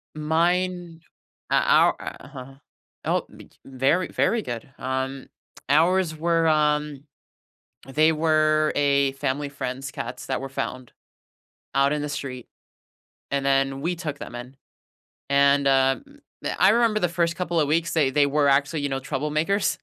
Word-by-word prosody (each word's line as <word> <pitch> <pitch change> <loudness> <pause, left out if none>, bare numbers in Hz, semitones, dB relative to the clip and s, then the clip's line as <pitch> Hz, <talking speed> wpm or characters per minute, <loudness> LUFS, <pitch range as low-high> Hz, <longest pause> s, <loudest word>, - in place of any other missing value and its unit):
Mine 170 +2 -1 0.5
uh, - - +3
our - - +4
uh-huh 135 -2 -9 0.5
oh, - - 0
b - - -13
j - - -27
very, 135 +7 +1
very 230 0 +1
good, 120 +1 -6
um, 130 +1 -3 0.4
ours 165 +2 +3
were, 165 0 +1
um 150 -2 +1 0.8
they 155 +4 +3
were 155 -1 +2
a 140 -1 +2
family 140 +1 -2
friend's 135 0 -5
cats 125 -3 -7
that 130 -1 -2
were 135 - -5
found 130 -2 -5 0.8
out 140 +1 +3
in 150 - -2
the 150 - -4
street, 130 -4 -6 0.8
and 140 -1 -1
then 135 0 +1
we 175 +4 -1
took 150 -4 -5
them 120 - -9
in, 125 +2 -9 0.7
and, 140 0 +4
uh, 135 0 +3
m 285 +1 -19 0.4
I 190 - +6
remember 225 -1 +3
the 180 - +1
first 170 -1 0
couple 175 -2 -1
of 145 - +2
weeks, 165 +2 0
they 150 -5 +2
they 145 0 +3
were 145 0 +2
actually, 145 +2 +1
you 145 - -1
know, 135 0 -2
troublemakers, 150 +8 -1
145 Hz, 150 wpm, -24 LUFS, 135-165 Hz, 0.8 s, I